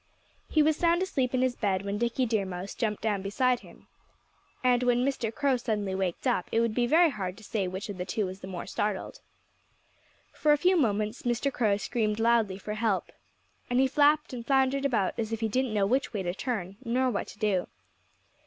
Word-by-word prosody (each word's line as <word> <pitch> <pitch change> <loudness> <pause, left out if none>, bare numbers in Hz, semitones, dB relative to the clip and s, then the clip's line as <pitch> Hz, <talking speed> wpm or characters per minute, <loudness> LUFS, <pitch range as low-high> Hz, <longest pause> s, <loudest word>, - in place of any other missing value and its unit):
He 310 - +4
was 310 0 +2
sound 340 +1 +2
asleep 265 -9 -1
in 255 - +2
his 255 -1 +1
bed 195 -3 -1
when 200 +1 -2
Dickie 235 +2 +1
Deer 220 -3 +1
Mouse 185 +1 -6
jumped 215 -3 -2
down 210 -3 0
beside 245 +5 +1
him. - - -16 0.8
And 250 -1 +4
when 245 0 +2
Mr. 255 -5 -1
Crow 275 +1 +1
suddenly 210 -5 -2
waked 190 +1 -2
up 240 -8 0
it 225 - +2
would 230 -1 +1
be 240 +1 +1
very 325 +4 +5
hard 190 -6 -4
to 220 - -14
say 200 -2 -2
which 190 +3 -5
of 200 -3 -7
the 180 - -2
two 200 +3 -1
was 185 +1 -6
the 190 - -9
more 185 -2 -6
startled. 210 - -3 1.1
For 300 -1 +3
a - - +3
few 360 +5 +3
moments 215 - 0
Mr. 245 +3 0
Crow 210 -5 +2
screamed 215 0 -1
loudly 225 -4 +2
for 210 +2 -5
help. 215 -2 -1 0.6
And 245 +1 +2
he 265 - +5
flapped 295 +2 +3
and 240 -2 -5
floundered 270 +1 +2
about 220 -9 +1
as 220 -1 -2
if 225 0 -3
he 225 - +1
didn't 255 +3 0
know 205 -2 +2
which 255 +6 0
way 200 -3 -2
to 175 -1 -2
turn, 200 -4 -4
nor 255 +1 +1
what 200 - -2
to - - -12
do. 205 -4 0
225 Hz, 215 wpm, -28 LUFS, 200-255 Hz, 1.1 s, very